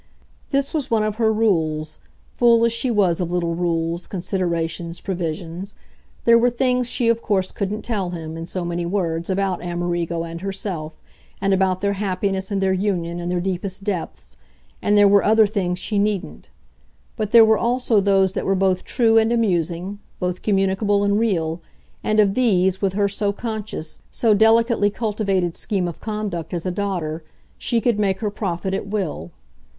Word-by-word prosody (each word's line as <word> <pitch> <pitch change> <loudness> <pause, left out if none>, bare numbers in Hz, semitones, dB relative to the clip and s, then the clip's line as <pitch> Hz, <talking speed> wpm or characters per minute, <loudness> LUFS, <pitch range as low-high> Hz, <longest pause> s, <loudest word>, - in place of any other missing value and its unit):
This 275 -1 0
was 300 -4 -1
one 225 -2 +2
of 215 0 -2
her 225 -2 +3
rules 160 -8 0 0.3
full 235 -1 +4
as 235 - +1
she 240 +2 0
was 195 -7 +2
of 175 -1 -2
little 170 -1 0
rules, 170 0 -1
considerations, 170 -3 -2
provisions. 175 +1 -4 0.5
There 235 0 +6
were 245 +1 +4
things 250 0 0
she 240 - 0
of 230 0 +2
course 190 -4 0
couldn't 205 +1 -3
tell 205 -6 -2
him, 160 -2 -6
in 165 0 -6
so 180 -1 -3
many 175 0 -2
words, 170 -2 -2
about 190 -1 0
Amerigo 175 -1 -2
and 170 0 -7
herself, 190 -5 -4 0.4
and 195 0 +1
about 185 -1 +1
their 200 0 +1
happiness 195 -1 -2
and 200 -2 -1
their 190 -1 +2
union 180 -3 -1
and 175 0 -3
their 180 - 0
deepest 190 +1 -3
depths 195 -5 -5 0.4
and 205 0 +3
there 205 0 +7
were 200 0 +5
other 220 +1 +5
things 195 -4 -1
she 205 +2 -1
needn't; 200 - -2 0.7
but 215 -2 -2
there 230 0 +8
were 220 0 +3
also 240 -3 +2
those 195 -1 +3
that - - -3
were 195 - +3
both 190 -1 +1
true 225 -2 +3
and 220 +1 +2
amusing, 185 -3 0 0.2
both 180 -1 -2
communicable 200 0 +1
and 205 +1 +2
real, 170 -7 0 0.4
and 215 0 +1
of 200 -2 +4
these, 190 -6 +2
with 195 -2 +1
her 200 +1 +2
so 200 0 0
conscious, 215 -7 -5
so 225 -3 +3
delicately 225 0 +4
cultivated 200 -5 -1
scheme 195 -5 -1
of 170 - -6
conduct 210 -6 -4
as 170 - -4
a 185 - 0
daughter, 175 -5 -3 0.4
she 235 - +1
could 225 -1 +1
make 195 -2 +1
her 210 -2 -1
profit 190 -2 -3
at 195 - -3
will. 185 - -3
195 Hz, 175 wpm, -21 LUFS, 175-215 Hz, 0.7 s, there